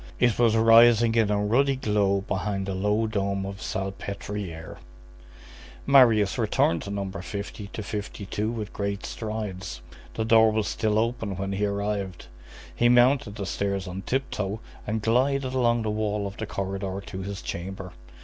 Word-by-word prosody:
It 120 Hz, -2 st, +2 dB
was 115 Hz, -2 st, +4 dB
rising 115 Hz, 0 st, +6 dB
in 115 Hz, -2 st, +3 dB
a 105 Hz, -, +2 dB
ruddy 130 Hz, +7 st, +2 dB
glow 105 Hz, -5 st, +1 dB
behind 95 Hz, 0 st, -2 dB
the 95 Hz, -, -3 dB
low 105 Hz, +4 st, +1 dB
dome 100 Hz, -2 st, -1 dB
of 100 Hz, 0 st, -6 dB
Salpêtrière. 95 Hz, -3 st, -5 dB, 1.1 s
Marius 115 Hz, -8 st, +5 dB
returned 85 Hz, -, +2 dB
to 100 Hz, -, -7 dB
No. 100 Hz, -1 st, -3 dB
50 100 Hz, +2 st, -6 dB
52 105 Hz, 0 st, -4 dB
with 110 Hz, -3 st, -5 dB
great 100 Hz, 0 st, -3 dB
strides. 105 Hz, -, -5 dB, 0.3 s
The 110 Hz, -, -1 dB
door 110 Hz, 0 st, +6 dB
was 110 Hz, -1 st, 0 dB
still 110 Hz, -2 st, 0 dB
open 115 Hz, -3 st, -1 dB
when 95 Hz, 0 st, -3 dB
he 100 Hz, +1 st, 0 dB
arrived. 100 Hz, -2 st, -3 dB, 0.5 s
He 120 Hz, -, +3 dB
mounted 125 Hz, -3 st, +4 dB
the 100 Hz, -3 st, -4 dB
stairs 100 Hz, -1 st, -2 dB
on 90 Hz, +2 st, -5 dB
tip 130 Hz, +5 st, -2 dB
toe 100 Hz, +1 st, -3 dB, 0.3 s
and 110 Hz, 0 st, -2 dB
glided 130 Hz, +3 st, +1 dB
along 120 Hz, -3 st, +2 dB
the 110 Hz, -, -1 dB
wall 105 Hz, -1 st, -1 dB
of 100 Hz, 0 st, -5 dB
the 110 Hz, -, -4 dB
corridor 95 Hz, -1 st, -4 dB
to 95 Hz, -, -6 dB
his 100 Hz, 0 st, -6 dB
chamber. 95 Hz, +1 st, -6 dB
105 Hz, 160 wpm, -26 LUFS, 100-115 Hz, 1.1 s, rising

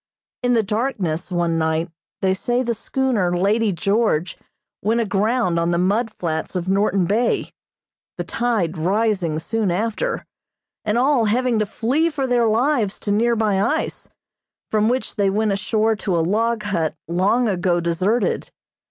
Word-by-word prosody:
In 245 Hz, 0 st, +2 dB
the 225 Hz, -2 st, +3 dB
darkness, 195 Hz, -6 st, -2 dB
one 170 Hz, -2 st, 0 dB
night, 160 Hz, +1 st, 0 dB, 0.3 s
they 190 Hz, 0 st, +3 dB
say 240 Hz, +6 st, 0 dB
the 235 Hz, -1 st, 0 dB
schooner 225 Hz, -6 st, 0 dB
"Lady 210 Hz, +4 st, +2 dB
George" 195 Hz, -2 st, 0 dB, 0.5 s
went 225 Hz, +4 st, +1 dB
aground 210 Hz, -3 st, +1 dB
on 170 Hz, 0 st, +1 dB
the 170 Hz, -, +1 dB
mud 210 Hz, +6 st, +1 dB
flats 165 Hz, -3 st, -3 dB
of 180 Hz, 0 st, -2 dB
Norton 195 Hz, -1 st, +2 dB
Bay, 225 Hz, +6 st, 0 dB, 0.6 s
the -, -, -2 dB
tide 210 Hz, -9 st, -1 dB
rising 190 Hz, -2 st, +1 dB
soon 215 Hz, +5 st, -1 dB
after, 210 Hz, +5 st, -1 dB, 0.6 s
and 215 Hz, +2 st, 0 dB
all 255 Hz, -2 st, +3 dB
having 240 Hz, +1 st, +1 dB
to 215 Hz, -, 0 dB
flee 260 Hz, +10 st, +1 dB
for 285 Hz, -4 st, -2 dB
their 245 Hz, -2 st, +2 dB
lives 230 Hz, -2 st, +1 dB
to 205 Hz, -, -2 dB
nearby 215 Hz, -2 st, +2 dB
ice, -, -, -1 dB, 0.6 s
from 215 Hz, 0 st, +2 dB
which 255 Hz, 0 st, -2 dB
they 200 Hz, -1 st, +3 dB
went 210 Hz, +2 st, +1 dB
ashore 215 Hz, +2 st, +1 dB
to 190 Hz, -4 st, -1 dB
a -, -, +2 dB
log 225 Hz, +4 st, 0 dB
hut 165 Hz, -7 st, -1 dB
long 195 Hz, +8 st, +2 dB
ago 180 Hz, -3 st, +1 dB
deserted. 185 Hz, +7 st, 0 dB
210 Hz, 150 wpm, -21 LUFS, 180-230 Hz, 0.6 s, the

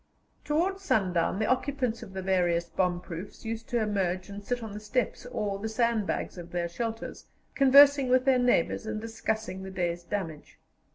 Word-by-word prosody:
Towards 355 Hz, +6 st, 0 dB
sundown 185 Hz, -, +1 dB
the 215 Hz, -, +1 dB
occupants 255 Hz, -2 st, 0 dB
of 205 Hz, -5 st, -10 dB
the 190 Hz, -1 st, -4 dB
various 175 Hz, -3 st, +2 dB
bomb 180 Hz, 0 st, 0 dB
proofs 175 Hz, +5 st, -8 dB
used 225 Hz, +2 st, -5 dB
to 240 Hz, -2 st, +1 dB
emerge 190 Hz, -4 st, -1 dB
and 200 Hz, 0 st, -8 dB
sit 245 Hz, +2 st, -2 dB
on 220 Hz, -2 st, -6 dB
the 210 Hz, -, -5 dB
steps 215 Hz, +3 st, -2 dB
or 205 Hz, -5 st, -2 dB
the 220 Hz, +2 st, -3 dB
sandbags 220 Hz, -5 st, 0 dB
of 175 Hz, 0 st, -9 dB
their 175 Hz, -1 st, -1 dB
shelters, 225 Hz, +6 st, -5 dB, 0.3 s
conversing 275 Hz, 0 st, +7 dB
with 255 Hz, +1 st, +4 dB
their 265 Hz, -2 st, +4 dB
neighbours 245 Hz, -4 st, +2 dB
and 220 Hz, -1 st, -2 dB
discussing 220 Hz, -3 st, -3 dB
the 190 Hz, -, -6 dB
day's 175 Hz, -2 st, -2 dB
damage. 165 Hz, -6 st, -5 dB
215 Hz, 175 wpm, -28 LUFS, 185-245 Hz, 0.3 s, conversing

